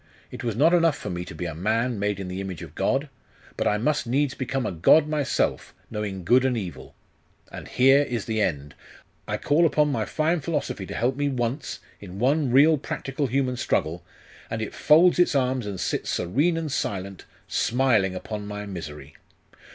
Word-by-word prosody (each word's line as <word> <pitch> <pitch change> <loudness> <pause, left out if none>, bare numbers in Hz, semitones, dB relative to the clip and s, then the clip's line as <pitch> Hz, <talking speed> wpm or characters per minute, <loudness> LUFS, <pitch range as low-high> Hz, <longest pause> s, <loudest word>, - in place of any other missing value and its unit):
It - - -8
was 115 -3 -2
not 155 +8 +4
enough 165 -4 +3
for 100 - -6
me 90 0 -4
to 80 - -9
be 90 - -4
a 85 - -4
man 110 +7 0
made 100 -1 -1
in 95 - -5
the 90 +1 -4
image 95 -4 -6
of 80 -3 -11
God: 135 - 0 0.5
but - - -1
I 105 - +2
must 145 +4 0
needs 135 +2 +1
become 130 -1 -3
a - - -1
god 120 - +5
myself, 150 -4 -1 0.2
knowing 100 -3 -4
good 125 +8 +4
and 130 -2 +1
evil. 95 -6 -7 0.6
And - - -8
here 135 +2 +5
is 120 -7 -3
the 110 -1 -1
end! 75 -7 -2 0.5
I - - -1
call 150 +4 +2
upon 150 -2 +3
my 115 -5 -1
fine 160 +7 0
philosophy 145 - -3
to - - -6
help 125 +3 0
me 145 0 0
once, 125 +1 -3 0.2
in 95 -2 -10
one 135 +5 +2
real 145 +5 +5
practical 135 +1 -3
human 130 0 0
struggle, 85 -5 -1 0.5
and 115 - -3
it 110 - -4
folds 175 +4 +5
its 175 -4 +3
arms 130 -4 0
and 100 -3 -5
sits - - -2
serene 145 - +1
and 160 -3 -3
silent, 95 -6 -3 0.2
smiling 115 -7 +1
upon 105 +2 -6
my 105 0 -5
misery! 75 -7 -8
120 Hz, 190 wpm, -25 LUFS, 95-140 Hz, 0.6 s, god